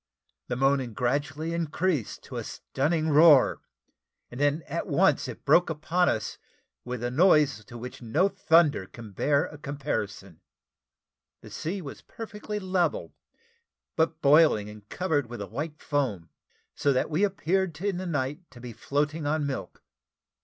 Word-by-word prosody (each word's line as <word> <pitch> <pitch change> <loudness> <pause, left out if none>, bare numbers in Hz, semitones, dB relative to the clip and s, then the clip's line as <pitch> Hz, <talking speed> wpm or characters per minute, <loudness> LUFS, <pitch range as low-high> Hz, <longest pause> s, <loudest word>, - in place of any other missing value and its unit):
The 125 - -2
moaning 135 -2 +1
gradually 145 +6 -1
increased 165 - -1
to - - -8
a - - -3
stunning 155 +3 -1
roar, 150 -2 +6 0.7
and 125 - -8
then 145 +2 +1
at - - -4
once - - +2
it - - -9
broke 175 0 +5
upon 170 +3 +1
us 110 -1 -3 0.4
with 125 -1 -5
a 120 - -1
noise 150 - +4
to 120 - -10
which 125 +2 -8
no 145 - +2
thunder 165 - +3
can 115 -1 -11
bear 140 +8 +1
a 150 - -10
comparison. 135 - -4 1.0
The - - -13
sea 180 +4 -4
was 140 - -9
perfectly 210 -1 -7
level, 185 -3 -1 0.8
but 160 0 0
boiling, 140 -8 +5
and 105 0 -15
covered 155 -8 -1
with 120 - -7
a - - -4
white 150 +1 -5
foam, 125 - -2 0.4
so 140 - +1
that 130 +4 0
we 160 +6 +1
appeared 190 -4 0
in 195 -1 -1
the 185 0 -4
night 145 +2 -3
to 130 - -15
be 120 -1 -8
floating 145 +5 -2
on 150 0 0
milk. 140 -2 -5
145 Hz, 155 wpm, -27 LUFS, 125-170 Hz, 1.0 s, roar